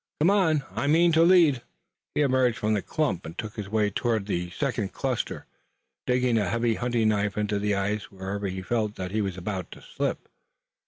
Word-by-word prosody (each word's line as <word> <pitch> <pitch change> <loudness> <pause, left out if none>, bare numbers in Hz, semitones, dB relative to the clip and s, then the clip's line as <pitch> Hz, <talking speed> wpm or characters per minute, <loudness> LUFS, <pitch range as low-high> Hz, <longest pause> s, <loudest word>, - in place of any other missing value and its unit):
Come 165 +6 +4
on! 160 -8 +3
I 115 +8 -2
mean 170 +3 +5
to 160 0 +4
lead." 165 -7 +5 0.5
He - - +2
emerged 130 -4 +2
from 110 0 0
the 105 - +1
clump 145 - -1
and 80 +2 -9
took 110 +1 -5
his 105 -4 -6
way 105 -1 +1
toward 110 -1 0
the 90 -3 -2
second 120 -2 -2
cluster, 130 -3 -3 0.6
digging 125 -2 +2
a 100 -4 0
heavy 115 +2 +1
hunting 120 -1 +1
knife 105 -1 0
into 105 -1 0
the 105 0 0
ice 100 +1 -2
whenever 100 +1 -4
he 95 0 -4
felt 110 0 -1
that 90 -1 -5
he 110 +1 0
was 95 -3 -3
about 95 0 -4
to - - -14
slip. - - -3
110 Hz, 200 wpm, -26 LUFS, 100-130 Hz, 0.6 s, mean